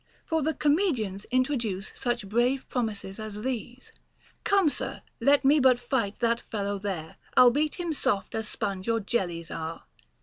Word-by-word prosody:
* - - -34
For 320 -1 +2
the 315 +2 0
comedians 275 - +1
introduce 235 -6 -1
such 240 -5 -2
brave 245 +5 +1
promises 215 -5 -3
as 215 -1 -6
these: 250 0 -4 0.5
Come, 395 -4 +4
sir, 290 - -2 0.2
let 280 0 +4
me 295 +3 +6
but 260 -2 +5
fight 240 -4 -1
that 235 0 +2
fellow 200 -2 -3
there; 180 -6 -5 0.2
I'll 250 -1 +9
beat 300 +4 0
him 345 -2 -1
soft 255 -9 0
as 220 -1 -2
sponge 200 -1 -3
or 230 0 +2
jellies 175 -6 -2
are. 165 0 -5
235 Hz, 165 wpm, -28 LUFS, 200-265 Hz, 0.5 s, I'll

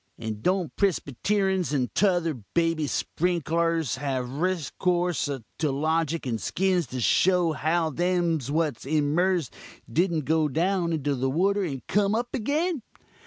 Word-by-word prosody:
And 110 -2 -5
don't 180 - 0
Prisbeteruns 190 - 0
and 130 -4 0
tother 175 -5 +2 0.2
baby 165 -3 +1
sprinklurs 165 -3 0
have 130 -2 -2
reskorse 175 +3 -1
to 140 +3 -4
loguk 155 +3 0
and 115 -3 -2
skins 185 -4 +1
to 130 - -5
show 175 +7 +3
how 160 +2 0
them 175 0 +1
what's 150 -4 -1
emerz'd 155 +2 +1 0.3
didn't 165 +2 0
go 160 +1 +2
down 170 +4 0
into 145 -3 0
the 135 0 0
water 195 +8 +2
and 135 -8 -4
come 205 +1 +2
up 240 +1 -1
agin? 300 +6 0
165 Hz, 130 wpm, -26 LUFS, 145-180 Hz, 0.3 s, show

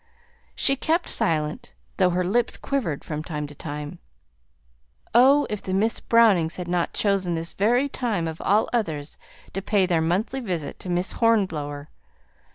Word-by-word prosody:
She 275 - +2
kept 325 +5 0
silence, 160 +8 -2 0.2
though 185 -2 +4
her 180 +1 0
lips 230 +7 0
quivered 225 - -2
from 155 -1 -4
time 150 -3 -4
to 145 - -10
time. 150 +3 -7 1.1
Oh, 270 +5 +6
if 210 -2 -6
Miss 195 +4 +1
Brownings 200 -9 +4
had 180 -1 -5
not 175 -1 0
chosen 195 -4 0
this 165 +1 -3
very 245 +7 +2
time 225 -11 -2
of 160 0 -6
all 210 +3 +3
others 155 -11 -2 0.3
to 195 - -2
pay 200 -1 +2
their 170 -3 +1
monthly 190 +11 0
visit 180 - -4
to 185 - -8
Miss 175 +1 0
Hornblower! 155 -11 0
185 Hz, 155 wpm, -24 LUFS, 160-230 Hz, 1.1 s, Oh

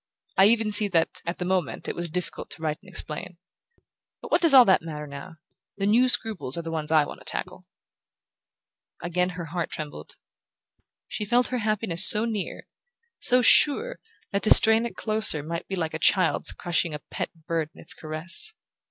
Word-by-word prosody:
I 190 - +6
even 220 0 +3
see 205 0 +5
that, 165 -4 0
at 170 - -3
the 180 - -4
moment, 180 -5 -2
it - - -4
was 170 0 -2
difficult 180 +3 -5
to 160 - -11
write 155 0 -2
and 195 - -17
explain. 180 0 -5 0.8
But - - -11
what - - +2
does 330 -3 +4
all 260 -3 +8
that 190 - +3
matter 150 -2 -7
now? 145 +4 -10 0.4
The 195 - -2
new 240 +5 +3
scruples 215 - 0
are 170 - -4
the 165 - -6
ones 155 -1 -4
I 155 -2 +4
want - - -10
to - - -16
tackle." - - -6 1.4
Again 180 +1 -1
her 170 - -5
heart 170 +1 -4
trembled. 150 -2 -6 0.9
She 215 - -4
felt 245 +4 +1
her 250 - -2
happiness 210 -5 +2
so 210 +3 +7
near, 215 -4 -5 0.5
so 250 0 +2
sure, 445 - +4 0.3
that 200 - -1
to 215 - +1
strain 225 +1 +4
it - - -12
closer 215 -9 +2
might 165 +2 -6
be 195 - -4
like 160 -3 -3
a 160 - -4
child's 185 -1 +2
crushing 170 -2 -2
a - - -7
pet - - -4 0.2
bird 165 -2 -2
in - - -16
its - - -2
caress. 165 - -2
180 Hz, 190 wpm, -25 LUFS, 160-220 Hz, 1.4 s, all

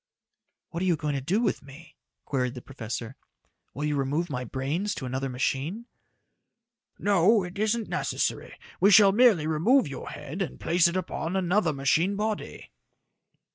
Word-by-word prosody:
"What 170 - -4
are - - 0
you 175 - +3
going 150 -1 -3
to 140 - -2
do 185 - 0
with 240 - 0
me?" 140 +4 -14 0.3
queried 125 -2 -1
the 125 - -7
professor. 120 -1 -6 0.6
"Will 145 +3 -3
you 150 -1 0
remove 145 +5 -1
my 125 -2 -3
brains 140 - -2
to 135 - -5
another 130 +2 -3
machine?" 140 - -2 1.1
"No, 205 +1 +3
it 180 +2 -7
isn't 220 +1 0
necessary. - - -2 0.2
We 200 - +5
shall 200 -1 +7
merely 210 -7 +4
remove 195 - +3
your 140 - -7
head 150 +6 -7
and 190 - -4
place 170 +1 +3
it 170 +2 -1
upon 175 -1 -3
another 185 -1 +2
machine 155 +7 +1
body." 215 +1 -4
165 Hz, 160 wpm, -27 LUFS, 135-200 Hz, 1.1 s, shall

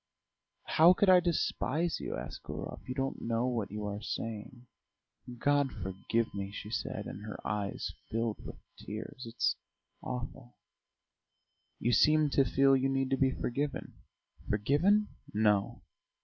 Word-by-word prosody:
"How 165 +3 +6
could 195 +1 +3
I 185 -1 +9
despise 170 -2 0
you?" - - -4
asked - - -6
Gurov. - - -6
"You 125 - -2
don't 135 0 -2
know 115 +1 0
what 115 -5 -1
you 105 +1 -4
are 105 0 -4
saying." 115 +3 -5 0.7
"God 145 +1 +2
forgive 100 +4 -2
me," 100 0 -4
she 105 +1 -7
said, - - -3
and - - -7
her 105 -1 -6
eyes 100 0 -2 0.2
filled 115 -1 -2
with - - -7 0.2
tears. 110 +4 -7
"It's 115 +1 +1 0.5
awful." 125 0 -6 1.2
"You 120 - +1
seem 150 +4 +5
to 135 - +5
feel 135 +2 +4
you 135 0 +2
need 135 0 0
to - - +4
be 135 0 +4
forgiven." 140 +2 -3 0.6
"Forgiven? 165 - +3 0.3
No. 105 -2 +2
125 Hz, 140 wpm, -32 LUFS, 105-140 Hz, 1.2 s, I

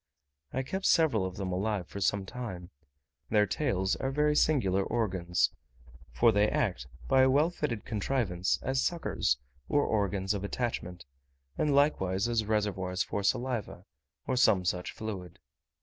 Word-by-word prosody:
I 130 - -2
kept 190 +8 -2
several 135 - +3
of 90 - -8
them 95 -2 -3
alive 100 0 -1
for 100 - -7
some 100 0 +1
time: 95 -6 -7 0.6
their 105 -1 +4
tails 100 -4 0
are 135 - -2
very 150 +2 +2
singular 100 -12 +2
organs, 95 -6 0 0.6
for 90 - +4
they 105 0 +3
act, 90 - -1 0.2
by 130 - +5
a 130 - +5
well 150 +6 +3
fitted 120 - -3
contrivance, 105 -5 0
as 130 0 0
suckers 165 - 0 0.3
or 145 - +3
organs 100 -2 0
of 100 -1 -3
attachment, 100 - -3 0.5
and 145 - +1
likewise 100 -9 +2
as 115 -2 0
reservoirs 100 -4 0
for 100 - -3
saliva, 120 +2 -1 0.4
or 130 - -1
some 100 -7 +4
such 90 0 -1
fluid. 95 -5 -6
105 Hz, 150 wpm, -30 LUFS, 95-130 Hz, 0.6 s, by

